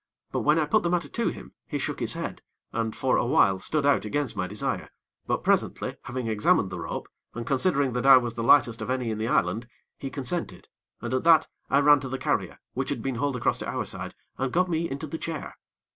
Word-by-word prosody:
But - - -1
when 150 +2 +3
I 155 - +2
put 215 +8 +3
the 170 - 0
matter 175 0 0
to 235 - -1
him, - - -5
he - - -2
shook - - -3
his - - 0
head, - - -5 0.3
and, 115 -1 -1
for 130 -2 +2
awhile, 100 -6 +3
stood 150 +7 -1
out 145 - +3
against 125 +2 -2
my 90 -2 -2
desire; 105 +3 -2 0.4
but, - - 0
presently, - - +1
having 125 0 -4
examined 105 -3 +2
the 90 - -5
rope, - - -5 0.3
and 120 0 -4
considering 140 -1 +2
that 125 +2 0
I 135 -1 +10
was 120 -2 -1
the 115 - -4
lightest 115 -3 +5
of 110 - -4
any 125 -3 -1
in 110 - -3
the 110 - -1
island, 110 +2 +1 0.3
he 135 - -4
consented, 145 +5 -4 0.3
and 120 +1 -3
at 130 - 0
that 160 -2 +6 0.2
I 140 - +4
ran 145 0 +6
to 135 -1 -6
the 130 - -3
carrier - - -1 0.2
which - - -2
had - - -3
been 135 - -1
hauled 140 +2 0
across 120 - 0
to - - -5
our - - -2
side, - - -6 0.2
and 135 -1 -1
got 180 +2 +2
me 165 +1 0
into 140 +3 -4
the 160 +2 -6
chair. 160 -3 -5
130 Hz, 235 wpm, -26 LUFS, 115-150 Hz, 0.4 s, I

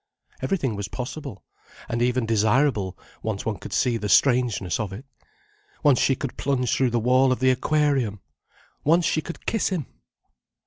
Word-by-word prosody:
Everything 140 - -1
was 100 -1 -4
possible: 125 -4 -7 0.4
and 115 +1 -2
even 125 0 +1
desirable, 110 -2 +1 0.2
once 110 -3 -3
one 110 -3 -2
could - - -9
see 125 -3 +1
the 105 -2 -4
strangeness 120 -8 +2
of 105 -3 -3
it. 105 +8 -8 0.8
Once 140 -4 +5
she 135 - +3
could 135 -2 -6
plunge 130 -3 0
through 130 -2 +2
the 120 0 0
wall 130 +3 +3
of 130 - 0
the 130 0 +4
aquarium! 135 -5 +1 0.6
Once 165 +3 +3
she 155 - +1
could 170 - -9
kiss 225 - 0
him! 175 -8 -2
125 Hz, 165 wpm, -24 LUFS, 110-140 Hz, 0.8 s, Once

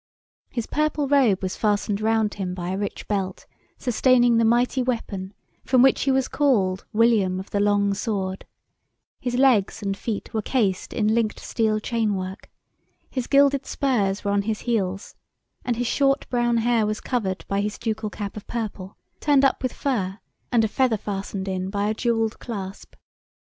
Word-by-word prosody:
His 235 -3 -3
purple 305 -1 0
robe 255 -9 +3
was 185 - -2
fastened 210 -1 0
round 220 -1 +1
him 185 -2 -4
by 175 -1 -4
a 190 - -2
rich 205 - -4
belt, 195 -3 -2 0.3
sustaining 245 -1 +3
the 230 - +4
mighty 240 +3 +2
weapon, 215 -6 -3 0.3
from 255 -1 +4
which 270 - +4
he 275 - +3
was 265 -1 +2
called 200 -11 +1
"William 210 -5 +3
of 190 - -9
the 200 - 0
long 205 0 +2
Sword," 195 -3 -3 0.7
his 245 -1 -2
legs 240 -5 +3
and 195 -1 -1
feet 210 +1 -5
were 220 - 0
cased 205 -6 0
in 215 -2 +1
linked 225 -2 0
steel 220 -2 0
chain 220 -2 0
work, 190 +2 -6 0.6
his 255 -3 -3
gilded 280 -1 +4
spurs 210 -8 0
were 200 - 0
on 200 0 +2
his 215 +1 -3
heels, 200 -5 -2 0.5
and 245 - 0
his 245 +2 -2
short 275 +3 +1
brown 240 -1 +2
hair 230 -1 +2
was 215 0 -2
covered 200 -7 -2
by 200 0 0
his 210 +1 -3
ducal 220 -2 -2
cap 205 -1 -6
of 210 - -9
purple, 205 -5 -5 0.2
turned 280 -2 +4
up 270 - +2
with 255 -2 -1
fur, 200 -9 -2 0.3
and 235 -2 +4
a - - +3
feather 245 0 +1
fastened 195 -1 -4
in 185 0 -2
by 200 +1 -1
a 215 - +1
jewelled 225 -1 0
clasp. 200 -4 -7
220 Hz, 175 wpm, -24 LUFS, 200-245 Hz, 0.7 s, the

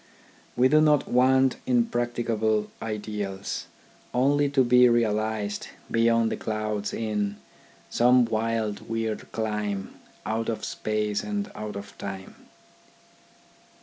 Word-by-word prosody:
We 125 +1 +6
do 155 +3 +5
not 150 -2 +3
want 130 +1 +4
impracticable 120 - 0
ideals, 105 - -4 0.5
only 140 +3 +3
to 135 -2 +3
be 125 0 +6
realised 110 -2 0 0.2
beyond 115 0 +3
the - - -2
clouds 110 -1 -2
in 105 -2 -2 0.3
" - - -28
Some 125 +1 +5
wild, 110 -2 -2
weird 115 -1 -3
clime, 105 -3 -3 0.3
Out 110 +1 -1
of 115 - -3
Space, 105 -1 -2
and 205 -1 -3
out 105 0 -6
of 100 0 -8
Time." 95 -1 -6
110 Hz, 115 wpm, -26 LUFS, 105-125 Hz, 0.5 s, We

